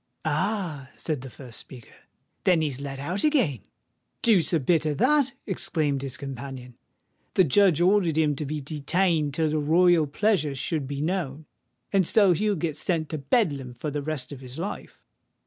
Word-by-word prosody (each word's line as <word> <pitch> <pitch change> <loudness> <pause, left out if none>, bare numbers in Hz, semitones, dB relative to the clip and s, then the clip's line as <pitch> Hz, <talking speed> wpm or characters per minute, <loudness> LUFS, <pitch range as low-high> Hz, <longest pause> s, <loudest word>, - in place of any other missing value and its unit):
"Ah!" 155 -3 -1
said 155 -5 -3
the 135 - -8
first 125 -2 -10
speaker: 125 -4 -13 0.5
"then 175 -4 +3
he's 140 -3 -3
let 140 -1 -5
out 175 +9 -2
again?" 250 - +2 0.6
"Deuce 195 -9 +4
a 165 - +3
bit 160 +3 +2
of 150 -2 -1
that!" 270 +3 +3
exclaimed 150 -7 -1
his 135 -2 -4
companion. 135 -2 -7 0.6
"The 185 - +6
judge 175 +1 +4
ordered 180 -3 +3
him 150 -2 +2
to 150 - -3
be 150 +1 -3
detained 155 +1 0
till 160 -1 +1
the 155 - +1
royal 165 +1 +4
pleasure 155 -3 +1
should 145 +1 -2
be 140 0 -4
known; 155 -3 -2 0.5
and 190 -4 +3
so 200 -4 +5
he'll 210 +4 +1
get 160 -3 -2
sent 155 0 -1
to 155 - -3
Bedlam 140 - 0
for 150 +4 -4
the 145 0 -2
rest 145 -3 -4
of 135 -2 -8
his 130 0 -10
life." 190 +5 -6
155 Hz, 175 wpm, -26 LUFS, 140-180 Hz, 0.6 s, The